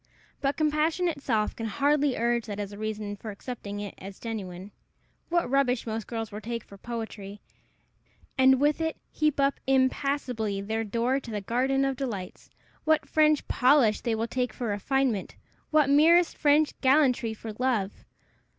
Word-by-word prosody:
But 275 0 0
compassion 310 +3 +1
itself 265 -9 -1
can 225 - -4
hardly 285 +4 +1
urge 235 0 0
that 205 -1 -5
as 205 -1 -4
a 205 - -9
reason 215 -1 -4
for 215 +2 -8
accepting 205 -1 -6
it 205 -2 -6
for 195 0 -9
genuine. 195 -4 -6 0.6
What 345 0 +1
rubbish 255 -2 +1
most 225 -1 -4
girls 225 -2 -4
will 210 +1 -7
take 230 0 -4
for 200 - -14
poetry, 210 -2 -7 1.0
and 265 -1 +5
with 295 +3 +2
it 320 -1 -1
heap 305 -2 0
up 275 0 +2
impassably 260 -5 0
their 220 +3 -2
door 235 +5 0
to 245 - -11
the 210 -2 -3
garden 260 +6 +1
of 270 -1 -1
delights! 215 -9 -5 0.3
what 315 0 +2
French 305 -1 +3
polish 250 -5 +4
they 235 -2 0
will 225 +1 -1
take 250 +1 -2
for 240 -4 -4
refinement! 225 0 -1 0.3
what 305 -3 +4
merest 325 +5 +5
French 295 0 +3
gallantry 260 -5 +3
for 220 0 -7
love! 235 -7 +1
245 Hz, 160 wpm, -27 LUFS, 215-280 Hz, 1.0 s, and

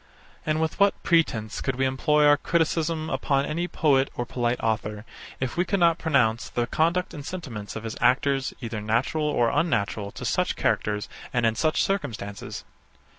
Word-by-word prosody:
And 155 0 +1
with 160 +3 -1
what 200 0 +3
pretence 130 -11 +1
could 130 - -1
we 135 +1 +1
employ 150 +3 +2
our 145 0 +7
criticism 160 0 0
upon 140 -1 +1
any 170 +4 -2
poet 140 -6 +2
or 120 - -2
polite 120 0 -1
author, 110 -1 -2 0.3
if 130 -2 -2
we 175 - +3
could 200 +1 -1
not 170 -1 +4
pronounce 125 -8 +1
the 120 - -1
conduct 170 +7 0
and 145 - -7
sentiments 130 - -6
of 110 - -5
his 110 -1 -5
actors 135 +2 +2
either 110 -3 -4
natural 120 +8 0
or 120 -6 +2
unnatural 110 -10 0
to - - -7
such - - 0
characters, 105 0 0 0.2
and 120 -2 +1
in 115 - +3
such 155 +8 +1
circumstances? 110 - -4
135 Hz, 175 wpm, -25 LUFS, 115-160 Hz, 0.3 s, our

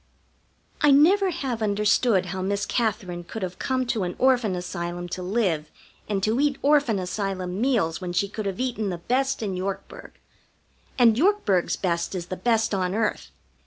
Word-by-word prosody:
I 295 - +5
never 365 +8 +5
have 260 -9 -3
understood 210 -1 +2
how 190 - -3
Miss 200 +2 -1
Katherine 185 -7 -2
could 190 +5 -7
have 180 0 -5
come 260 -1 0
to 235 -3 -1
an 180 -1 -3
Orphan 250 -7 +2
Asylum 175 0 -4
to 185 - -4
live 180 -6 0 0.4
and 195 -2 -1
to 220 +4 +1
eat 285 -1 +2
Orphan 285 -6 +3
Asylum 185 0 -3
meals 215 -11 +1
when 180 -1 -4
she 180 +3 +1
could 210 +1 -5
have 195 +2 -4
eaten 240 -5 -1
the 175 - -3
best 255 +7 -1
in 195 -3 -2
Yorkburg. 190 +1 -6 0.8
And 230 -3 +5
Yorkburg's 325 - +2
best 170 0 -2
is 175 -2 -4
the - - -2
best 225 +2 +1
on 185 -1 0
earth. 225 0 -1
205 Hz, 170 wpm, -25 LUFS, 185-245 Hz, 0.8 s, I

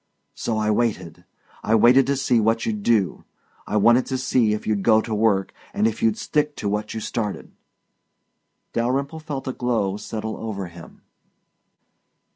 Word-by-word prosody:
So 110 - -3
I 110 0 +1
waited. 95 -7 -2 0.4
I 110 - +2
wanted 125 +4 +5
to 140 - +1
see 125 -3 +2
what 115 +1 +1
you'd 105 -2 -2
do. 100 -5 +1 0.4
I 105 - 0
wanted 120 +4 +4
to 130 - -1
see 125 -3 +2
if 105 - -4
you'd 105 -2 0
go 110 +1 +5
to 110 0 -4
work, 105 -3 +1 0.2
and 105 - +2
if 115 -1 -1
you'd 110 -2 +2
stick 150 -1 -1
to - - -4
what 105 +2 -2
you - - -2
started." 105 -2 -4 1.2
Dalyrimple 135 +6 -1
felt 145 -4 -6
a 130 - -2
glow 115 -6 -1
settle 110 +1 -5
over 105 -4 -5
him. 85 -1 -14
110 Hz, 165 wpm, -23 LUFS, 105-125 Hz, 1.2 s, wanted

